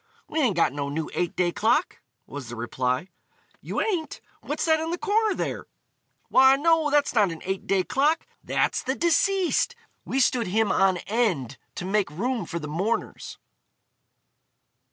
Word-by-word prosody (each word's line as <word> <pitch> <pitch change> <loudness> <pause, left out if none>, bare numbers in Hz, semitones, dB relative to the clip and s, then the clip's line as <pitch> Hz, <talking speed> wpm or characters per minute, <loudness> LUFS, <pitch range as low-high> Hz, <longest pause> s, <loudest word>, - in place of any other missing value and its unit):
"We 315 - -2
ain't 245 - +2
got 165 -5 +2
no 140 -1 -3
new 155 +2 -4
eight 175 -2 -2
day 175 -1 +1
clock," 230 - +1 0.2
was 140 -4 -8
the 120 - -6
reply. 125 +7 -2 0.5
"You - - -3
ain't? 355 -8 -2 0.2
What's 295 - -3
that 320 -1 +3
in 320 +1 -3
the 345 - -2
corner 425 +1 +1
there?" - - -4 0.6
"Why, 265 +1 +6
no, 320 +1 +2
that's 290 0 +2
not 210 -6 +3
an 165 - -8
eight 190 +1 -3
day 195 -1 +2
clock; 300 - +1 0.2
that's - - 0
the 260 +1 -2
deceased. 380 +7 +2 0.3
We 265 - -2
stood 240 -3 +2
him 215 +3 +1
on 190 -1 +3
end 180 - -1 0.2
to 180 - -5
make 200 -1 +1
room 220 - -2
for 170 - -4
the 150 -3 -5
mourners." 190 +10 -3
220 Hz, 165 wpm, -25 LUFS, -, 0.6 s, Why